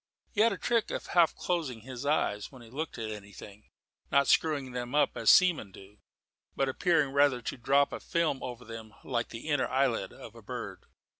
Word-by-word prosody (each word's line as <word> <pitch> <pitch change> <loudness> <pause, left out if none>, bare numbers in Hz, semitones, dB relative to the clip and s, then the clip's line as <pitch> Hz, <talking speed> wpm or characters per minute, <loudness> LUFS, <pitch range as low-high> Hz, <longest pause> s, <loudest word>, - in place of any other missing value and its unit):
He 210 - +1
had 230 +1 +5
a - - -3
trick 230 -2 0
of - - -4
half 170 -3 +3
closing 150 -10 -2
his 130 +3 -7
eyes 105 -9 0
when 130 -3 -13
he 115 - -15
looked 155 +2 -4
at 110 -2 -4
anything, 100 0 -11 0.4
not 140 0 +4
screwing 145 -5 +2
them 125 +2 -4
up 150 - +3
as - - +2
seamen 175 - +5
do, 100 +2 -15 0.6
but 135 - +1
appearing 150 +1 +2
rather 140 -3 +4
to - - -3
drop 140 +3 +2
a - - -4
film 170 -5 0
over 125 -1 -7
them 110 -1 -9
like 120 -3 -2
the 115 +6 -8
inner 145 -3 +1
eyelid 130 -3 0
of - - -11
a - - -13
bird. - - -7
130 Hz, 200 wpm, -30 LUFS, 115-150 Hz, 0.6 s, had